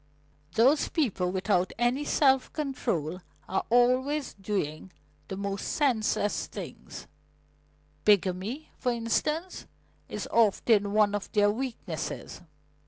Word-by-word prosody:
Those 265 +8 +4
people 205 - 0
without 185 -1 +1
any 245 +5 +1
self 270 -3 +3
control 190 - -2 0.3
are 190 - -1
always 255 +5 +2
doing 190 -4 -3 0.4
the 190 - -5
most 200 0 -3
senseless 225 -7 +1
things - - -9 1.0
bigamy, 205 - +1
for 250 - +1
instance, 300 +10 -2 0.4
is - - -4
often 210 -2 +3
one 210 -1 +4
of 205 -1 -3
their 205 -1 +4
weaknesses." 220 -8 -5
220 Hz, 105 wpm, -28 LUFS, 195-260 Hz, 1.0 s, Those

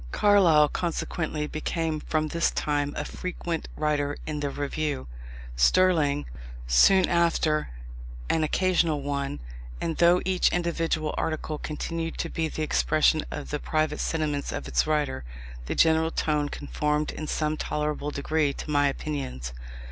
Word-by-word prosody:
Carlyle, 180 -8 +5
consequently 160 -2 -2
became 155 +1 -2
from 155 0 -1
this 170 +1 +1
time 145 -1 -1
a - - -2
frequent 175 -2 -4
writer 145 -1 0
in 150 -1 -3
the 145 -1 -1
Review; 145 - -3 0.5
Sterling, 145 - +3 0.4
soon 180 - +5
after, 165 -3 +2 0.6
an 160 - +1
occasional 165 -3 +1
one; 140 0 -3 0.4
and 165 -2 -2
though 175 +1 +5
each 185 -1 +3
individual 165 -3 -1
article 155 -1 -2
continued 165 +2 -4
to 165 - -2
be 165 -1 -1
the 155 - -4
expression 155 0 +2
of - - -6
the 150 - -1
private 155 0 0
sentiments 150 -3 -1
of - - -5
its - - +1
writer, 150 - 0 0.4
the - - -2
general 160 0 +4
tone 150 -2 0
conformed 150 +1 -1
in 155 - -6
some 155 0 0
tolerable 150 -1 -2
degree 150 0 0
to 150 - -6
my 145 -1 +4
opinions. 135 - -4
155 Hz, 140 wpm, -26 LUFS, 145-165 Hz, 0.6 s, Carlyle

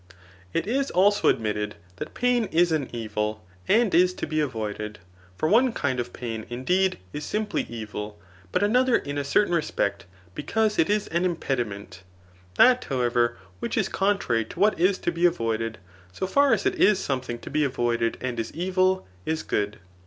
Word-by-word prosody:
It 165 - -1
is 270 +6 0
also 205 +3 +4
adimtted, 105 -1 -2 0.2
that - - -7
pain 245 -2 +2
is 175 -2 +2
an 150 -5 0
evil 110 -3 -3 0.2
and 225 -2 +3
is 180 +1 +4
to - - -3
be 155 0 -3
inroided; 105 -6 -3 0.4
for 155 - 0
cme 235 +6 +4
kind 130 -4 -1
of 120 0 -3
pain, 115 -3 -5
indeed, 180 +11 +1 0.2
is 150 - -4
simply 210 +6 -2
evil, 105 -2 -6 0.3
bat 185 - +1
another 250 +4 +3
in 145 -6 -2
a - - -1
certain 175 +7 +2
respect, 100 - -1 0.3
because 215 - 0
it 160 - +3
is 210 0 +1
an 170 +2 0
impediment. 115 - -3 0.5
That, 250 - +6
however, 120 -2 +1 0.2
which - - -3
is - - +1
contrary 195 - +1
to 140 - -11
what 205 -2 +3
is 185 +2 +3
to - - -1
be 170 +1 +3
avoided, 115 -8 -2 0.4
80 - - -1
far 280 +8 +3
as 210 -3 +2
it - - +2
is 210 -1 +6
something 130 -8 -3
to 115 - -10
be 155 +1 +2
avoided 120 -4 0
and 125 -2 -3
is 115 - -3
evil, 185 +2 +1 0.2
is 160 0 -1
good. 105 0 -1
150 Hz, 175 wpm, -25 LUFS, 115-190 Hz, 0.5 s, That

